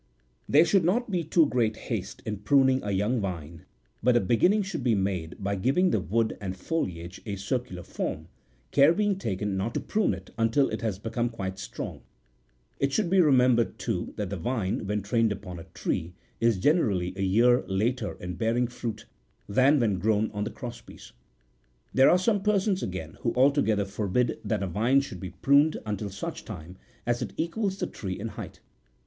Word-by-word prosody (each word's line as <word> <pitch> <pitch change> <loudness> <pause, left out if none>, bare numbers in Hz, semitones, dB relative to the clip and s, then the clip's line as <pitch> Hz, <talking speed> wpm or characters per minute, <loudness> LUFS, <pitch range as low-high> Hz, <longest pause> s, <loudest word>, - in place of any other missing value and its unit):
There 155 +4 +6
should 185 +2 +3
not 215 +7 +1
be 175 -3 0
too 160 +1 +4
great 120 -5 +1
haste61 - - -5
in 105 -1 -3
pruning 130 +5 +3
a 100 - -4
young 105 +5 +1
vine, 85 -4 -5 0.4
but 125 +1 +3
a - - +5
beginning 150 - +3
should 190 -8 -4
be 120 -3 +3
made 95 -4 -2
by 100 0 -2
giving 140 - +2
the - - +2
wood 110 +6 0
and 95 -2 -4
foliage 90 - -3
a 100 - -2
circular 100 -2 -3
form, - - -4 0.4
care 145 +3 +6
being 205 0 +2
taken 105 - -2
not 105 +5 -2
to - - +1
prune 210 - 0
it 95 +1 -12
until 115 +5 +3
it - - -4
has 110 -5 -1
become 115 +3 -2
quite 95 -4 -5
strong; - - -6 0.8
it 140 0 +1
should 185 +1 0
be 190 -1 +6
remembered, 125 -6 +4
too, - - -3
that 100 -3 -3
the 100 - -2
vine, 100 0 -2
when 105 -1 -1
trained 115 +1 +2
upon 95 -4 -6
a 85 - -10
tree, 90 -1 -3 0.2
is 115 -3 +3
generally 95 - +2
a 95 - -4
year 115 +6 +4
later 105 +3 -1
in 90 0 -5
bearing 115 +5 +1
fruit 115 -3 -5 0.4
than 130 +8 +4
when 105 -6 +1
grown 110 +2 +1
on 105 -1 -3
the - - -2
cross 120 -3 -8
piece. - - -14 0.8
There 135 +1 +6
are 180 - +6
some 200 +2 +1
persons, 200 -1 +1
again, 85 -4 -5
who 115 - -1
altogether 125 -6 +3
forbid 105 +4 -1
that^ 105 -3 -1
a - - -1
vine 115 +10 +3
should 95 -9 -7
be 95 - -5
pruned 145 +3 +5
until 105 -1 -3
such 100 0 -6
time 85 +4 -9 0.3
as 120 0 0
it - - -4
equals 195 +4 -1
the - - -1
tree 95 -4 -5
in 115 +3 -4
height. 105 - -9
115 Hz, 190 wpm, -27 LUFS, 95-135 Hz, 0.8 s, There